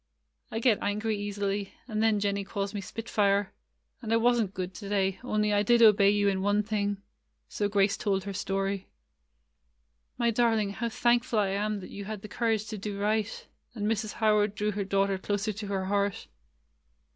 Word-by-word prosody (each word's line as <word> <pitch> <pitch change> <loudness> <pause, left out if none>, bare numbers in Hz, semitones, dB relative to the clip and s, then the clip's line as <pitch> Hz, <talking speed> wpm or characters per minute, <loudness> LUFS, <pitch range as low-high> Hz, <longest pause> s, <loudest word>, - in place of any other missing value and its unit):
get 230 -4 +4
angry 215 +2 -1
easily, 205 -1 -3
and 215 -3 -2
then 220 -2 +3
Jennie 200 0 0
calls 200 +1 -4
me 205 - -3
spitfire. 200 -2 0 0.5
And 225 -3 -5
I - - +4
was 240 +1 +3
n't 200 -4 -2
good 185 0 -4
to 200 +2 -8
day, 195 -2 0
only 210 -3 +1
I 205 - +3
did 235 +3 +4
obey 205 -2 +7
you 205 0 +2
in 190 -1 +1
one 205 +1 +2
thing." 205 -1 -1 0.5
So 205 - -1
Grace 200 +1 +2
told 195 -2 0
her 200 0 -5
story. 195 0 -2 1.3
''My 235 -1 +2
darling, 225 -3 +2
how 230 +4 -3
thankful 240 0 +1
I 205 -2 +2
am 205 +1 -1
that 185 - -10
you 200 0 -7
had 210 -1 -6
the - - -6
courage 220 -1 0
to 215 -2 -5
do 200 0 -4
right;" 215 +1 -1 0.3
and 210 -2 -3
Mrs. 215 0 -1
How 215 -1 +3
ard 205 0 +1
drew 210 0 0
her 205 0 -2
daughter 195 0 +1
closer 205 +2 -1
to 205 +1 -6
her 195 -1 -2
heart. 200 0 0
205 Hz, 190 wpm, -28 LUFS, 200-215 Hz, 1.3 s, obey